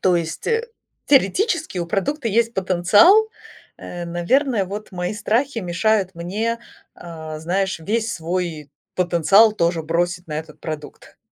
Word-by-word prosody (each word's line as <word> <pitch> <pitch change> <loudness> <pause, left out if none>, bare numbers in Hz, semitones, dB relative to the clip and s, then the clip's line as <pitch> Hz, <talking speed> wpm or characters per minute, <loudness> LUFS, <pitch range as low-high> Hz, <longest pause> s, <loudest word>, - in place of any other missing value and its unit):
то 185 - +3
есть, 165 -1 -4
э, 460 +1 0 0.4
теоретически 315 - +2
у 170 - -2
продукта 230 - -1
есть 230 +2 +1
потенциал, 200 - +5 0.5
э, 175 -1 -7
наверное, 200 - +1
вот 205 +2 -7
мои 180 +2 -3
страхи 230 +5 0
мешают 190 +1 0
мне, 215 +7 -3 0.3
а, 160 -2 -8
знаешь, 190 +1 -1
весь 225 +6 -1
свой 165 -3 -4 0.2
потенциал 180 +5 +4
тоже 170 -4 0
бросить 175 +2 -1
на 150 - -3
этот 160 - -10
продукт. 155 -2 -8
185 Hz, 135 wpm, -21 LUFS, 170-225 Hz, 0.5 s, потенциал